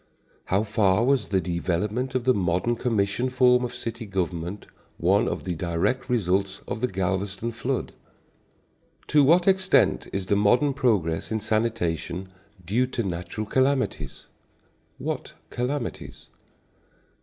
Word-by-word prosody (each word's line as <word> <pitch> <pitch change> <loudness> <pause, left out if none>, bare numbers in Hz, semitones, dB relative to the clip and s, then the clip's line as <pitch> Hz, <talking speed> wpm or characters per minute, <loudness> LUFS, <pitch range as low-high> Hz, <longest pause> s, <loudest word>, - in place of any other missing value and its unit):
How 100 +3 +1
far 105 0 +2
was 135 0 +2
the 95 - +1
development 95 +9 -2
of 130 - +1
the 130 +1 +4
modern 90 +4 0
commission 115 0 0
form 125 -1 +4
of 125 - -2
city 115 -1 -6
government 90 0 -3 0.3
one 95 +5 +3
of - - -3
the 90 - -2
direct 90 - -1
results 95 -4 0
of 110 - -4
the 125 - +2
Galveston 95 +3 -2
flood? 125 +3 -3 1.2
To 150 -1 +5
what 170 +7 +4
extent 190 -1 +3
is 95 -1 -2
the 100 - +1
modern 125 +8 +3
progress 105 - 0
in 110 - 0
sanitation 95 -5 -1 0.4
due 120 +8 +1
to 125 -2 -2
natural 90 +3 -4
calamities? 130 +4 0 0.7
What - - -4 0.2
calamities? 125 +1 -4
110 Hz, 130 wpm, -25 LUFS, 95-125 Hz, 1.2 s, To